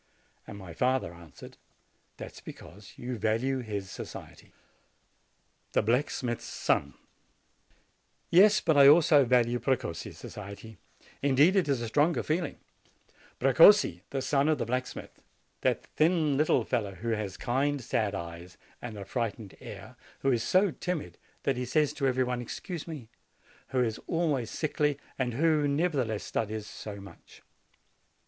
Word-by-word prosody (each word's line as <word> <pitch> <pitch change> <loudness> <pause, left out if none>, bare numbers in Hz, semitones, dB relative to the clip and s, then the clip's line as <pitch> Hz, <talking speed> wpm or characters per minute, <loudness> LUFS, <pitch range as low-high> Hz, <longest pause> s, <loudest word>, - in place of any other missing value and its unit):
And - - -8
my 95 -4 -9
father 125 -2 0
answered, 85 -3 -13 0.6
'That - - -8
is - - -13
because 100 +2 -12
you 120 -2 -5
value 115 +6 0
his 100 -5 -5
society." - - -10 1.2
THE - - +3
BLACKSMITH'S 120 +1 -1
SON 70 0 -1 1.4
Yes, 210 +4 +6
but 160 -3 +2
I 140 -1 +8
also 150 -2 +6
value 120 -1 +2
Precossi's 120 -9 -2
society 100 +1 -10 0.4
indeed 145 +7 +4
it 185 -6 +2
is 135 -4 +1
a 115 - -3
stronger 150 +9 +2
feeling, 160 +1 -2 0.8
Precossi, 135 - +6
the 135 -1 -3
son 140 +2 +2
of 155 - +2
the 125 - -2
black 125 +2 -1
smith, - - -10 0.4
that - - +1
thin, 155 -2 +1
little 155 +3 +2
fellow, 105 -6 -2
who 115 +6 -5
has 105 -4 -2
kind, 140 +3 0
sad 110 -4 -1
eyes 85 0 -8 0.2
and 115 -3 -7
a 100 - -7
frightened 115 -4 -4
air; - - -10 0.2
who 135 - +2
is 120 -3 +1
so 185 - +3
timid 180 -1 -5 0.2
that 135 -3 0
he 125 - -2
says 150 +4 +1
to 135 - -1
every 130 0 +2
one, 125 -1 -2
"Excuse 165 +7 -6
me"; 150 -8 -7 0.6
who 130 -1 +1
is 110 -2 -2
always 150 -9 0
sickly, 150 -2 -1 0.2
and 125 -3 -1
who, 155 0 +2
nevertheless, 140 - 0
studies 110 -1 -3
so 105 -1 -8
much. 100 0 -15
125 Hz, 145 wpm, -29 LUFS, 110-150 Hz, 1.4 s, I